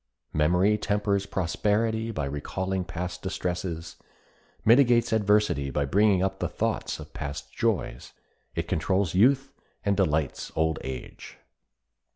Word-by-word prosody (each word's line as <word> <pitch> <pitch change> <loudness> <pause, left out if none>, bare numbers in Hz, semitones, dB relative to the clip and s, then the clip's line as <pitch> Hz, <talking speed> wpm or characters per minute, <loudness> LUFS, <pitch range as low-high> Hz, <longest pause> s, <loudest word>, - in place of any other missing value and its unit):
Memory 90 +7 +3
tempers 100 -1 0
prosperity 110 +5 0
by 80 -11 -2
recalling 95 +7 -2
past 90 +1 -5
distresses, 90 -2 -4 0.7
mitigates 120 0 +5
adversity 105 -9 +2
by 70 +2 0
bringing 100 +4 +3
up 95 0 -1
the - - -1
thoughts - - -2
of - - -11
past 70 0 -6
joys, - - -1 0.4
it - - -2
controls 95 +2 0
youth 135 +8 +4 0.3
and 100 -1 +3
delights 80 -7 0
old 80 -1 +1
age. 65 -2 -8
95 Hz, 120 wpm, -27 LUFS, 80-105 Hz, 0.7 s, mitigates